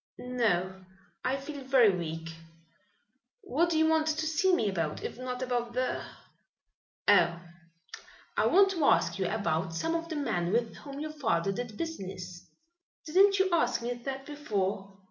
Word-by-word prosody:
"No, 190 -7 -1 0.4
I 260 +2 0
feel 280 0 -7
very 260 -5 +5
weak. 165 -1 -5 1.1
What 340 +1 +1
do 325 - +1
you 315 - +4
want 320 -1 +2
to 315 0 0
see 320 +4 +2
me 235 - +2
about, 165 -6 -2
if - - -5
not 255 0 -4
about 240 -2 -2
the 255 +1 -1 0.5
" - - -56
"Oh, 170 0 +5 1.0
I - - +3
want 390 +1 +5
to 335 -5 -1
ask - - +3
you 190 - +1
about 180 -5 -1
some 325 - -1
of 330 0 -2
the 320 - -3
men 175 - -1
with 230 +1 0
whom 280 -1 -8
your 305 +1 -5
father 225 - 0
did 220 +1 -5
business." 185 - -6 0.6
"Didn't 390 +5 +5
you 380 -1 +2
ask 245 -8 +1
me 240 +1 -1
that 270 +3 -6
before?" 200 -9 -3
250 Hz, 165 wpm, -30 LUFS, 195-310 Hz, 1.1 s, very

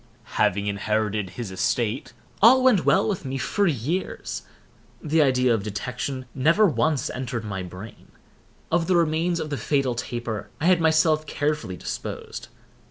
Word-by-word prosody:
Having 100 +2 +2
inherited 105 0 -1
his 105 +1 -6
estate, 115 +7 -1 0.3
all 255 +5 +7
went 245 -8 +4
well 195 +3 +4
with 200 -6 -2
me 135 -1 -3
for 200 +9 +1
years. 155 - -2 0.6
The 160 0 +2
idea 130 -3 +3
of 110 - 0
detection 125 +6 -4
never 165 +11 +4
once 155 -5 +1
entered 125 -3 -4
my 95 -2 -4
brain. 90 +4 -10 0.6
Of 165 0 +2
the 185 - +3
remains 170 +1 +1
of 155 -2 -4
the 145 - -1
fatal 130 +3 0
taper 120 -2 -4
I 160 - -2
had 180 -1 +4
myself 155 -1 +3
carefully 145 -12 -2
disposed. - - -6
135 Hz, 150 wpm, -24 LUFS, 110-165 Hz, 0.6 s, all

